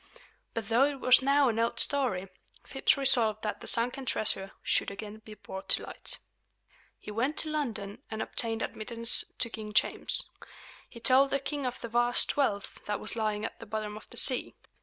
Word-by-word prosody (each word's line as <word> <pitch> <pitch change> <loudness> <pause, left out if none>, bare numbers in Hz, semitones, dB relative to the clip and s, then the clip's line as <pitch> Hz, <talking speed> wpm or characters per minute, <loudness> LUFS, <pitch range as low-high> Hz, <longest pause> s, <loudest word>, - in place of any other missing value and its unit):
But 225 -3 -3
though 240 +4 +4
it 285 -1 -3
was 255 +1 +5
now 280 +1 +3
an 225 -1 -1
old 230 0 0
story, 245 -10 +3 0.4
Phips 270 - +1
resolved 230 -6 +3
that 210 - -3
the - - -7
sunken 250 +3 +2
treasure 195 -3 0
should - - 0
again 210 +2 -8
be 215 -1 -12
brought 190 -2 -9
to - - +4
light. - - -4 0.8
He 210 - -9
went 250 +8 -1
to 310 - -1
London 220 -10 -4
and 220 - -5
obtained 225 0 -1
admittance 230 +1 +1
to - - +2
King 215 -1 -7
James. 215 - +2 0.7
He 235 - -12
told 265 +3 +5
the 275 - 0
king 280 -1 -3
of 250 - -5
the - - -5
vast 240 +1 +2
wealth 210 -9 -1
that 210 0 -2
was 215 - -2
lying 215 -1 -1
at - - -7
the 230 - -10
bottom 215 -1 -4
of 215 - -12
the - - -12
sea. 255 -2 0
230 Hz, 190 wpm, -29 LUFS, 215-260 Hz, 0.8 s, was